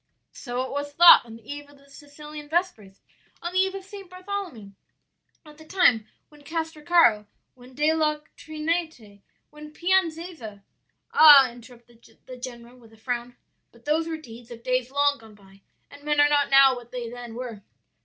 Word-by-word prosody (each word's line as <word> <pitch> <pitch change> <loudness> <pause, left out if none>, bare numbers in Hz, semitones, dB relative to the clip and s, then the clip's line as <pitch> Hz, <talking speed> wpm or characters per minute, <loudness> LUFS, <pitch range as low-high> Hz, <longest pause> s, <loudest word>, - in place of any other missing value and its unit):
'" - - -53
"'So 245 -1 -5
it - - -9
was 285 +1 -5
thought 345 +3 +8
on 225 - -11
the 225 -1 -17
eve 290 0 -8
of 285 - -19
the 280 0 -23
Sicilian 295 +1 -12
Vespers; 300 - -3 0.4
on 345 +1 -6
the 370 - +1
eve 380 0 +1
of 390 - -7
St. 390 -2 -12
Bartholomew; 365 - -7 0.7
at 300 0 -16
the - - -13
time 250 - +2 0.2
when 295 -1 -19
Castracaro, 320 -8 +1 0.3
when 250 0 -18
De 300 +3 +2
La 305 -1 0 0.2
Trinite, 310 - -5 0.3
when 300 0 -12
Pianeza 330 - -2 0.2
' - - -42
"'Ah,' 280 -5 +8
interrupted 240 0 -18 0.2
the 255 - -10
general 245 -1 -10
with 230 -3 -19
a - - -19
frown, 245 +1 -5 0.4
'but 235 0 -23
those 315 +2 0
were 325 -1 -4
deeds 240 -5 -14
of 235 -1 -12
days 255 -1 -1
long 285 +1 +1
gone 220 -2 -17
by, 195 -1 -21 0.3
and 285 - -14
men 295 0 0
are 290 0 +5
not 290 -1 +1
now 270 -1 +6
what 240 -1 -12
they 245 -2 -6
then 240 -1 -9
were.' 235 -4 -7
285 Hz, 185 wpm, -24 LUFS, 240-315 Hz, 0.7 s, thought